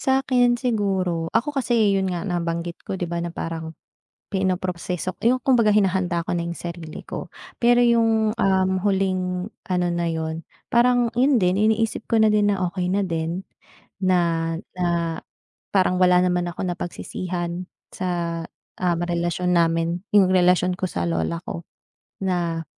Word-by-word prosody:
Sa'kin 255 Hz, -2 st, +2 dB
siguro 190 Hz, -8 st, 0 dB
ako 275 Hz, +6 st, 0 dB
kasi, 230 Hz, -6 st, +2 dB
'yon 190 Hz, -1 st, 0 dB
nga 170 Hz, -1 st, -3 dB
nabanggit 170 Hz, -1 st, -2 dB
ko 190 Hz, -, -5 dB
di 175 Hz, -, -2 dB
ba, 170 Hz, -, -3 dB
na 170 Hz, -, -4 dB
parang 165 Hz, -1 st, -5 dB, 0.6 s
pinoproseso 185 Hz, -2 st, -2 dB
yung 250 Hz, +3 st, +3 dB
kumbaga 235 Hz, -5 st, +4 dB
hinahanda 185 Hz, -4 st, +1 dB
ko -, -, -1 dB
na 170 Hz, -, -1 dB
yung 170 Hz, -, -5 dB
sarili 170 Hz, -2 st, -7 dB
ko. -, -, -6 dB, 0.3 s
Pero 240 Hz, +1 st, +5 dB
yung, 225 Hz, -2 st, +3 dB
um, 190 Hz, -4 st, +2 dB
huling 185 Hz, -2 st, 0 dB, 0.2 s
ano 180 Hz, -1 st, +1 dB
na 170 Hz, 0 st, -1 dB
'yon 160 Hz, 0 st, -3 dB, 0.3 s
parang 240 Hz, 0 st, +3 dB
'yon 260 Hz, 0 st, +4 dB
din 180 Hz, +2 st, +2 dB
iniisip 220 Hz, +1 st, +1 dB
ko 230 Hz, -, +4 dB
na 215 Hz, -, +5 dB
din 210 Hz, -1 st, +3 dB
na 195 Hz, -2 st, -1 dB
okey 180 Hz, -1 st, -2 dB
na 200 Hz, +1 st, +1 dB
din 165 Hz, +2 st, -2 dB, 0.6 s
na, 170 Hz, -3 st, +1 dB, 0.2 s
na 170 Hz, -2 st, 0 dB, 0.6 s
parang 185 Hz, -2 st, +3 dB
wala 180 Hz, 0 st, +5 dB
naman 180 Hz, -1 st, +1 dB
ako 175 Hz, -, -7 dB
napagsisihan 175 Hz, 0 st, -4 dB, 0.3 s
sa, 170 Hz, -2 st, -2 dB, 0.4 s
um, 175 Hz, -2 st, +1 dB
relasyon 175 Hz, +1 st, -1 dB
namin, 165 Hz, +1 st, +2 dB, 0.2 s
yung 190 Hz, -2 st, +6 dB
relasyon 180 Hz, 0 st, +4 dB
ko 185 Hz, -, -2 dB
sa 85 Hz, -, -3 dB
lola 85 Hz, -, -1 dB
ko 170 Hz, -, -5 dB, 0.6 s
na 170 Hz, -3 st, -1 dB
180 Hz, 150 wpm, -23 LUFS, 170-205 Hz, 0.6 s, yung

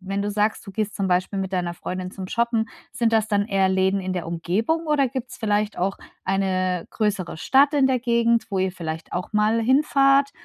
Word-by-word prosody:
wenn 195 Hz, +1 st, -3 dB
du 205 Hz, -, -2 dB
sagst, 210 Hz, +1 st, 0 dB
du -, -, -7 dB
gehst 210 Hz, 0 st, -2 dB
zum 195 Hz, -2 st, -1 dB
Beispiel 185 Hz, +2 st, 0 dB
mit 190 Hz, 0 st, -4 dB
deiner 175 Hz, -2 st, -1 dB
Freundin 185 Hz, +1 st, -5 dB
zum 190 Hz, -2 st, -7 dB
Shoppen, 235 Hz, -1 st, 0 dB, 0.2 s
sind 230 Hz, -1 st, 0 dB
das 220 Hz, -1 st, +3 dB
dann 205 Hz, -1 st, +1 dB
eher 195 Hz, -1 st, +2 dB
Läden 190 Hz, +1 st, +2 dB
in 185 Hz, 0 st, -3 dB
der 180 Hz, -3 st, -3 dB
Umgebung 215 Hz, -, -1 dB
oder 285 Hz, -4 st, +2 dB
gibt's 260 Hz, -1 st, -6 dB
vielleicht 210 Hz, -1 st, 0 dB
auch 190 Hz, +2 st, -1 dB, 0.3 s
eine 185 Hz, -2 st, 0 dB
größere 200 Hz, -6 st, -2 dB
Stadt 280 Hz, -, +4 dB
in 270 Hz, -2 st, +4 dB
der 255 Hz, -1 st, +2 dB
Gegend, 235 Hz, -1 st, +2 dB
wo 195 Hz, -, -1 dB
ihr 190 Hz, 0 st, +1 dB
vielleicht 160 Hz, -2 st, -6 dB
auch 180 Hz, +4 st, -4 dB
mal 215 Hz, +2 st, +2 dB
hinfahrt, 275 Hz, +2 st, +3 dB
205 Hz, 205 wpm, -23 LUFS, 185-235 Hz, 0.3 s, Stadt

